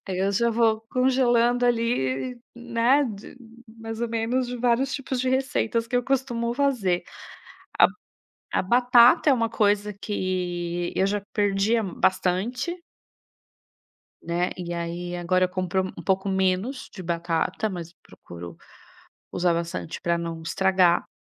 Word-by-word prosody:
daí 185 -1 -3
eu 195 +1 +1
já 235 +4 +2
vou 225 -1 +2
congelando 245 -1 +3
ali, 230 - 0
né, 240 +4 +2
de 215 +3 -8 0.3
mais 225 0 -8
ou 235 - -1
menos 230 +3 -1
de 245 0 -5
vários 245 +2 +1
tipos 265 -2 -3
de 260 - 0
receitas 245 -3 0
que 245 - -1
eu 245 - +2
costumo 240 -3 -1
fazer. 245 -11 +1 0.8
A - - +8
b - - -11 0.6
a - - +3
batata 245 +6 +5
é - - +6
uma 230 -2 0
coisa 210 -1 +1
que 175 -3 -3
eu 190 - +2
já 205 +1 0
perdia 205 +2 +2
bastante 220 - -1 1.4
né. 175 +2 -1
E 175 -1 -5
aí 175 +1 -4
agora 185 +1 +1
eu 180 - 0
compro 185 0 -1 0.2
um - - -7
pouco 190 0 0
menos 190 +7 0
de 190 - -7
batata, 170 +4 -1
mas 170 -3 -7
procuro 85 - -12 0.7
usar 175 -1 +1
bastante 165 - -4
pra 170 0 0
não 165 -1 -5
estragar. 185 0 +2
210 Hz, 140 wpm, -25 LUFS, 180-240 Hz, 1.4 s, A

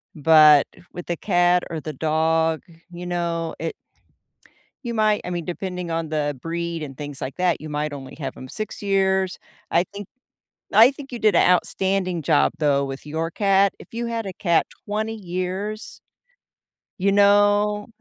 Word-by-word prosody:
but 155 -1 +7 0.3
with 175 - -7
the 175 - -1
cat 175 -1 +2
or 165 - -4
the 155 0 -6
dog, 160 +2 +1 0.3
you 175 0 -8
know, 170 -2 -2
it 165 0 -3 1.1
you 235 - -3
might 215 -2 +2
I - - -5
mean, 175 -2 -3
depending 180 -1 -4
on 165 -1 -2
the 145 -2 -1
breed 170 0 -3
and 135 -3 -8
things 145 -2 -7
like 130 - -5
that, 180 -3 +1
you 155 - -7
might 150 0 -2
only 135 -2 -9
have 135 -3 -5
'em 130 - -9
6 215 +11 -6
years. 190 -2 +1 0.3
I 170 - +3
think 200 +1 -10 0.7
I 225 +4 +8
think 275 -1 -11
you 240 - -5
did 215 -4 +3
a - - +5
outstanding 185 0 +1
job, 150 +1 +3
though, 140 -3 +2
with 135 +1 -7
your 160 +2 -3
cat. 195 +1 +2
If - - -15
you 235 +1 -3
had 230 -1 -3
a 190 - -5
cat 170 -3 +2 0.2
20 215 +2 -2
years 190 +3 -5 1.0
you 195 +2 +2
know, 205 +1 +3
175 Hz, 170 wpm, -23 LUFS, 160-200 Hz, 1.1 s, I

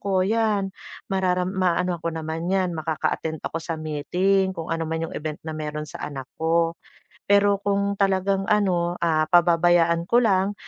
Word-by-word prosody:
ako, 190 -2 +1
'yan 210 -3 +1 0.4
mararam 185 -1 0
ma-anohan 180 -2 0
ko - - -1
naman 160 +1 -4
'yan, 185 -2 +1
makaka-attend 160 0 -2
ako 165 - -3
sa 165 0 -4
meeting, 180 +6 0
kung 165 0 -4
ano 165 0 -1
man 160 0 -2
'yong - - -11
event 155 0 -4
na 160 - -3
mayro'n 150 0 -4
sa 145 - -9
anak 135 -3 -6 0.2
ko. 165 +1 +2 0.6
Pero 200 0 +4
kung 200 0 0
talagang, 195 0 +1
ano, 180 -5 +2
ah, 155 -2 +2
pababayaan 170 0 +4
ko 240 +3 +4
lang 195 -2 +2
175 Hz, 165 wpm, -24 LUFS, 160-195 Hz, 0.6 s, Pero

